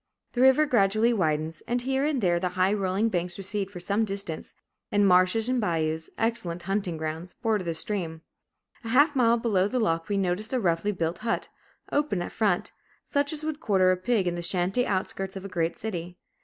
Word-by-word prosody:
The 245 Hz, -, 0 dB
river 265 Hz, +4 st, +6 dB
gradually 220 Hz, -2 st, +3 dB
widens, 160 Hz, -4 st, 0 dB
and 245 Hz, 0 st, -1 dB
here 265 Hz, +1 st, 0 dB
and 295 Hz, -4 st, 0 dB
there 175 Hz, -3 st, +2 dB
the 180 Hz, 0 st, -1 dB
high 185 Hz, +2 st, +3 dB
rolling 200 Hz, +2 st, 0 dB
banks 175 Hz, -3 st, -2 dB
recede 195 Hz, 0 st, -3 dB
for 190 Hz, -3 st, -9 dB
some 200 Hz, +5 st, 0 dB
distance, 195 Hz, -6 st, -5 dB, 0.4 s
and 205 Hz, -1 st, +4 dB
marshes 185 Hz, +5 st, +4 dB
and 255 Hz, -1 st, +1 dB
bayous, 160 Hz, -4 st, -1 dB
excellent 190 Hz, -7 st, -1 dB
hunting 190 Hz, -3 st, -2 dB
grounds, 160 Hz, +3 st, -5 dB
border 220 Hz, -4 st, -1 dB
the 170 Hz, -2 st, -2 dB
stream. 160 Hz, -3 st, -2 dB, 0.6 s
A 225 Hz, -, -5 dB
half 290 Hz, +5 st, +4 dB
mile 235 Hz, -2 st, +4 dB
below 205 Hz, -5 st, +1 dB
the 250 Hz, +4 st, -1 dB
lock 165 Hz, -6 st, 0 dB
we 200 Hz, -, 0 dB
noticed 195 Hz, +5 st, -1 dB
a 255 Hz, -, +2 dB
roughly 180 Hz, 0 st, +1 dB
built 170 Hz, -3 st, -2 dB
hut, 230 Hz, 0 st, -2 dB, 0.4 s
open 285 Hz, -12 st, 0 dB
at -, -, -6 dB
front, 205 Hz, -6 st, 0 dB, 0.3 s
such 285 Hz, +1 st, 0 dB
as 310 Hz, -1 st, -4 dB
would 310 Hz, -1 st, -3 dB
quarter 190 Hz, -9 st, +3 dB
a -, -, +3 dB
pig 195 Hz, +2 st, 0 dB
in 175 Hz, -, 0 dB
the 175 Hz, -, -4 dB
shanty 185 Hz, +7 st, +1 dB
outskirts 190 Hz, 0 st, -2 dB
of 195 Hz, 0 st, -7 dB
a -, -, -3 dB
great 170 Hz, -3 st, -1 dB
city. 175 Hz, -4 st, -5 dB
195 Hz, 200 wpm, -27 LUFS, 175-230 Hz, 0.6 s, river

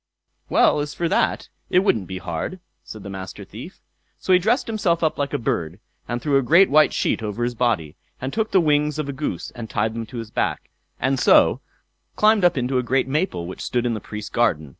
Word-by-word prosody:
"Well, -, -, +4 dB
as 145 Hz, 0 st, -4 dB
for 170 Hz, -, -1 dB
that, -, -, 0 dB, 0.2 s
it -, -, +2 dB
wouldn't 110 Hz, -, +1 dB
be 95 Hz, -, -5 dB
hard", 90 Hz, -, -5 dB, 0.2 s
said 110 Hz, -2 st, -10 dB
the 100 Hz, -, -7 dB
Master 95 Hz, -1 st, -8 dB
Thief. -, -, -11 dB, 0.4 s
So 190 Hz, -, +1 dB
he 180 Hz, -, +6 dB
dressed 225 Hz, +8 st, +1 dB
himself 190 Hz, -7 st, 0 dB
up 155 Hz, -, 0 dB
like 140 Hz, -1 st, -1 dB
a -, -, 0 dB
bird, 85 Hz, -5 st, -2 dB, 0.4 s
threw 140 Hz, +1 st, +1 dB
a -, -, +3 dB
great 170 Hz, +8 st, +5 dB
white 155 Hz, +1 st, +5 dB
sheet -, -, 0 dB
over 110 Hz, +2 st, -3 dB
his 120 Hz, 0 st, -1 dB
body, 115 Hz, -11 st, -1 dB, 0.4 s
took 220 Hz, +5 st, -1 dB
the 190 Hz, -, +4 dB
wings 150 Hz, -1 st, +1 dB
of 155 Hz, -2 st, -3 dB
a 140 Hz, -, -4 dB
goose 145 Hz, +3 st, -4 dB
and 115 Hz, -2 st, -8 dB
tied 110 Hz, 0 st, -1 dB
them 115 Hz, -1 st, -5 dB
to 125 Hz, -, -9 dB
his 115 Hz, -2 st, -6 dB
back, -, -, -2 dB, 0.3 s
and 130 Hz, +1 st, 0 dB
so -, -, +5 dB, 0.5 s
climbed 215 Hz, -2 st, +4 dB
up 175 Hz, -2 st, +4 dB
into 130 Hz, +1 st, 0 dB
a -, -, -1 dB
great 130 Hz, +2 st, +1 dB
maple 145 Hz, -, -1 dB
which 95 Hz, -, -8 dB
stood 120 Hz, 0 st, -1 dB
in 120 Hz, -, 0 dB
the 110 Hz, -, -3 dB
Priest's 105 Hz, 0 st, -8 dB
garden. 85 Hz, -11 st, +1 dB
130 Hz, 220 wpm, -22 LUFS, 110-155 Hz, 0.5 s, he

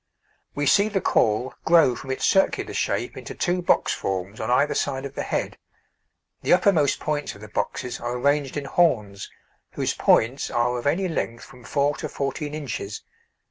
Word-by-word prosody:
We 145 Hz, -, -1 dB
see 200 Hz, +8 st, +4 dB
the 200 Hz, -2 st, 0 dB
caul 120 Hz, -, +1 dB
grow 160 Hz, -7 st, +5 dB
from 135 Hz, -, -9 dB
its 130 Hz, -, -1 dB
circular 195 Hz, -1 st, +2 dB
shape -, -, -1 dB
into -, -, -8 dB
two 180 Hz, 0 st, 0 dB
box 175 Hz, -, +2 dB
forms 95 Hz, +2 st, -4 dB
on 110 Hz, -, -3 dB
either 140 Hz, +4 st, +3 dB
side 135 Hz, -1 st, -2 dB
of 140 Hz, -, -7 dB
the -, -, -4 dB
head; -, -, -3 dB, 0.8 s
the -, -, +3 dB
uppermost 175 Hz, -6 st, +3 dB
points 150 Hz, -1 st, -2 dB
of 100 Hz, -, -14 dB
the 105 Hz, -, -9 dB
boxes 120 Hz, +4 st, -3 dB
are 120 Hz, +1 st, -3 dB
arranged 140 Hz, +1 st, +1 dB
in 145 Hz, -, -3 dB
horns, 110 Hz, -, +1 dB, 0.4 s
whose -, -, -1 dB
points 125 Hz, +5 st, +2 dB
are 120 Hz, +1 st, +1 dB
of 120 Hz, -, -3 dB
any 180 Hz, +6 st, +1 dB
length 115 Hz, -8 st, -3 dB
from 125 Hz, -2 st, -15 dB
4 145 Hz, +3 st, 0 dB
to -, -, -5 dB
14 145 Hz, +2 st, -3 dB
inches. 120 Hz, -8 st, -5 dB
140 Hz, 180 wpm, -24 LUFS, 120-155 Hz, 0.8 s, grow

